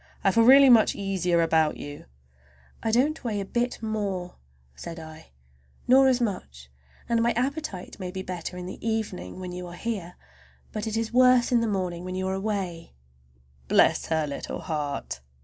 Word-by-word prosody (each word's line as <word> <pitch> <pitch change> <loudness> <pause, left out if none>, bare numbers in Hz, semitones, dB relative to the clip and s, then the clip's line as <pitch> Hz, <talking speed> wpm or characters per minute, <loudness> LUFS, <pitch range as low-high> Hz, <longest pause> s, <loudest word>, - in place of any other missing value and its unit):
I 195 - +4
feel 230 +3 +4
really 275 +2 +8
much 225 -3 +5
easier 180 -4 +1
about 160 -1 +2
you." 145 0 -8 0.8
"I 225 - -1
don't 275 +8 +1
weigh 220 -4 -2
a 200 - -3
bit 240 +3 -2
more," 200 -5 -3 0.4
said 165 - -8
I, 160 0 -11 0.6
"nor 265 +2 +6
as 255 -1 +3
much; 65 - -4 0.4
and 230 -1 +2
my 235 0 +2
appetite 255 - -3
may 185 -2 -4
be 190 +1 -5
better 180 -1 -6
in 180 - -6
the 185 - -8
evening, 220 - -3
when 180 -1 -6
you 180 0 -6
are 175 - -9
here, 190 -4 -4 0.6
but 215 +1 -4
it 220 0 -2
is 225 0 -2
worse 250 -1 +5
in 240 -1 +4
the 230 - 0
morning 180 -4 -2
when 185 0 -5
you 185 0 -2
are - - -1
away." 190 - -4 0.7
"Bless - - +3
her 160 -1 +1
little 140 -1 -5
heart!" 150 - -4
195 Hz, 180 wpm, -26 LUFS, 175-230 Hz, 0.8 s, really